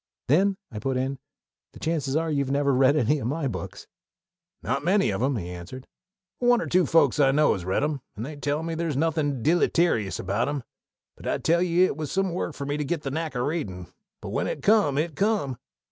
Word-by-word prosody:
"Then," 190 +8 +3
I 105 - -5
put 135 +2 -1
in, 135 +1 -2 0.5
"the - - -12
chances 150 -4 -1
are 160 0 0
you've 140 -2 0
never 140 0 +2
read 130 +2 +4
any 150 +1 +2
of 120 - -3
my 145 +2 -1
books." 125 - -6 0.8
"Not - - -1
many 190 - +3
of 95 - -2
'em," 135 +1 +1
he 90 -5 -4
answered; 90 +9 -8 0.5
"but 245 - 0
one 245 -1 +5
or - - -2
two 180 -1 +2
folks 150 -5 +3
I 140 -2 +5
know 150 +3 +4
has 95 -4 -5
read 95 +8 0
'em, 150 -2 -1
and 110 - -5
they 150 +2 -7
tell 145 +2 -2
me 165 0 -3
there's 160 -4 -2
nothin' 145 -5 0
deelyterious 165 - +2
about 100 +8 -1
'em. 145 -3 -3 0.5
But - - -9
I - - +1
tell 170 +2 +2
ye 180 0 +3
it 185 - +1
was 155 -2 -4
some 195 -2 0
work 170 -3 -3
for 140 - -5
me 145 +1 -2
to 150 - -1
get 150 +2 -2
the 135 - -3
knack 160 0 -3
o' 125 - 0
readin'; 95 - -4 0.3
but - - -6
when - - -1
it 140 - -4
come 205 -10 +4
it 155 0 -1
come! 195 - 0
145 Hz, 230 wpm, -26 LUFS, 130-165 Hz, 0.8 s, one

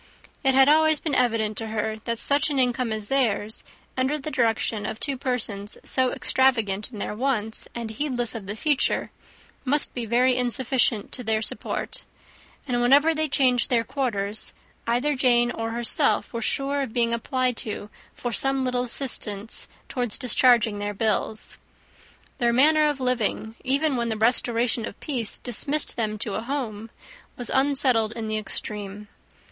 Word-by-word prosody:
It 265 -1 +3
had 270 0 +6
always 315 0 +4
been 305 - -3
evident 225 -4 +1
to 225 - -5
her 220 0 -2
that 235 -1 -1
such 285 +6 +3
an 285 - -2
income 250 -2 +1
as 215 -1 -3
theirs, 220 -5 +1 0.3
under 265 +3 0
the 305 +1 -6
direction 225 -3 0
of 220 +1 -5
two 280 -1 -1
persons 230 -6 -3
so 260 -1 +1
extravagant 225 -5 +1
in 220 - -9
their 205 - -4
wants, 220 -2 -1
and 230 -2 -5
heedless 245 -1 -2
of 215 -5 -7
the 205 - -4
future, 290 +4 0 0.5
must 285 +3 +2
be 240 -2 -4
very 250 +3 +3
insufficient 250 -3 +1
to 250 - -2
their 220 -1 0
support; - - -3 0.6
and 245 -2 0
whenever 285 +6 +5
they 310 -1 -1
changed 255 -3 +2
their 235 -2 +2
quarters, 220 -5 -1 0.3
either 250 +5 +1
Jane 240 -2 +3
or 225 -1 -4
herself 230 -1 +1
were 230 - -3
sure 280 +4 0
of 260 -5 -4
being 235 -1 +1
applied 255 +1 0
to 210 -1 -4 0.2
for 245 - -4
some 270 +4 +3
little 250 -1 0
assistance 230 -4 0 0.2
towards 245 -5 -1
discharging 235 -4 +3
their 205 0 -4
bills. 220 0 0 0.8
Their 240 -2 +2
manner 300 +5 +4
of 290 -2 -3
living, 235 -3 -1
even 280 +2 +1
when 235 -1 -1
the 220 - -2
restoration 235 +1 +1
of - - -10
peace 245 -8 -2
dismissed 280 +5 0
them 215 -2 -2
to 210 -1 -3
a 215 - -2
home, 230 -4 -4 0.5
was 245 - -6
unsettled 265 -5 +3
in 230 -1 -5
the 215 0 -1
extreme. 210 0 -4
240 Hz, 165 wpm, -24 LUFS, 220-265 Hz, 0.8 s, had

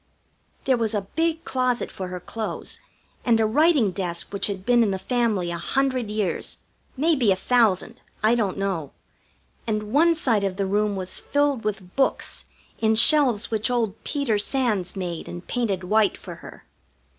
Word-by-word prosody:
There 260 -2 +3
was 225 -2 -1
a 205 - 0
big 325 0 0
closet 255 -1 -1
for 185 - -6
her 180 0 -6
clothes, 220 +4 -5 0.4
and 230 -2 +3
a 220 - +3
writing 285 - +3
desk 180 0 -3
which 200 - 0
had 195 -2 -5
been 240 -1 +4
in 220 - +3
the 190 - -1
family 215 -5 0
a 170 - -4
hundred 255 +2 0
years 210 -5 -2 0.4
maybe 275 -7 +3
a - - +4
thousand. 225 +1 +1 0.2
I 220 +2 +5
don't 210 -6 0
know. 190 -8 -3 0.7
And 215 0 -2
one 330 +3 +5
side 230 -10 +1
of 195 -1 -2
the 200 - 0
room 205 +1 0
was 185 -1 -4
filled 285 -4 0
with 195 -4 -4
books 270 - -1 0.3
in 220 0 +2
shelves 245 -4 +5
which 220 +2 0
old 230 -4 -1
Peter 275 -8 0
Sands 210 -6 0
made 175 -3 -5
and 175 0 -8
painted 210 -7 -1
white 210 +3 +2
for - - -9
her. - - -13
220 Hz, 170 wpm, -24 LUFS, 195-250 Hz, 0.7 s, I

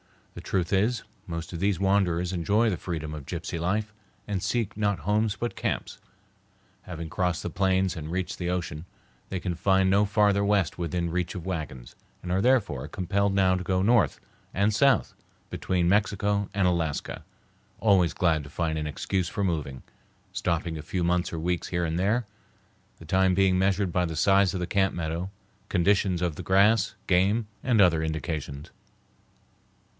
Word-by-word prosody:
The - - -8
truth 90 -2 -1
is, 110 +5 +1 0.2
most 85 0 -5
of 85 - -4
these 100 -1 +1
wanderers 95 -3 +1
enjoy 105 +6 +2
the 90 - -2
freedom 80 -3 -5
of 75 -3 -7
gypsy 85 - -4
life 105 +5 -1 0.3
and 100 -3 -2
seek 115 0 -1
not 100 -3 0
homes 105 +5 0
but 120 +3 -4
camps. - - -3 0.8
Having 85 -2 -7
crossed 90 -3 -1
the - - -3
plains 95 +1 +1
and 80 -2 -6
reached 95 0 -3
the 90 -1 -2
ocean, 85 -3 -3 0.4
they 95 - -3
can 90 0 -3
find 95 +2 +2
no 100 +2 +4
farther 100 -1 +3
west 100 -4 +1
within 85 0 -2
reach 90 +1 -2
of 90 -2 -6
wagons, 75 -9 -5 0.3
and 90 - -4
are 95 +1 +2
therefore 105 - +1
compelled 95 +3 0
now 95 -1 +4
to 90 - -3
go 95 +1 0
north 115 +1 +3 0.4
and 100 +3 +2
south 135 +5 +3 0.4
between 90 -2 0
Mexico 100 0 +1
and 100 -2 +2
Alaska, 85 -4 -2 0.6
always 95 -7 +3
glad 80 -4 +1
to 70 - -11
find 80 0 -2
an 75 - -3
excuse 90 +4 -2
for 100 - -2
moving, 75 -8 -2 0.5
stopping 85 -3 -2
a - - -5
few 90 +3 -3
months 90 +1 +1
or - - -3
weeks 90 +2 -1
here 85 -1 -1
and 80 +1 -2
there, 110 +6 +1 0.7
the 80 - -13
time 95 +3 +2
being 95 -1 +3
measured 95 0 +1
by 90 +1 +1
the 80 -1 -4
size 95 +3 +3
of - - -2
the - - 0
camp 95 +1 +1
meadow, 85 +2 -3 0.4
conditions 95 -1 +2
of 85 -4 -1
the - - -5
grass, 100 +4 +3
game, 100 +4 +2 0.2
and 120 -4 +2
other 85 -4 +4
indications. 80 -3 -4
90 Hz, 175 wpm, -27 LUFS, 85-100 Hz, 0.8 s, no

